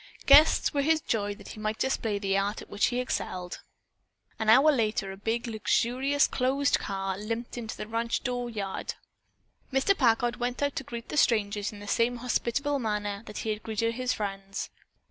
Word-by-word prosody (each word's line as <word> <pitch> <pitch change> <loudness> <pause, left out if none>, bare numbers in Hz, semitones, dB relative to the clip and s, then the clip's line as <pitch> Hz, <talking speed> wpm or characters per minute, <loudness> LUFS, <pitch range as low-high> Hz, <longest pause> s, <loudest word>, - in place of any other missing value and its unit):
Guests 290 +3 +6
were 285 - +2
his 315 +2 +3
joy 205 -9 -1
that - - -12
he - - -9
might 215 +1 -2
display 225 -5 0
the 195 -1 0
art 200 +2 0
at - - -12
which 205 - +2
he 245 - -1
excelled. 185 -7 -3 0.8
An 220 -1 0
hour 270 +7 +7
later 215 -6 0
a - - -7
big, 225 +4 -2
luxurious 245 +5 +1
closed 275 +2 +1
car 195 -1 -3
limped 230 +3 -4
into 230 -2 -6
the - - -5
ranch 230 +1 -2
door 245 -1 -2
yard. 200 -4 -4 0.8
Mr. 270 +9 +3
Packard 240 -4 +2
went 245 +2 -2
out 285 0 0
to - - -2
greet 235 -1 -8
the - - -3
strangers 205 -5 +2
in 205 -1 -11
the 205 - -9
same 235 +4 +1
hospitable 250 +4 0
manner 205 -3 -2
that 210 - -8
he 220 - 0
had 210 0 -4
greeted 230 +1 -1
his 255 +1 -1
friends. 195 -1 -4
230 Hz, 185 wpm, -28 LUFS, 205-250 Hz, 0.8 s, hour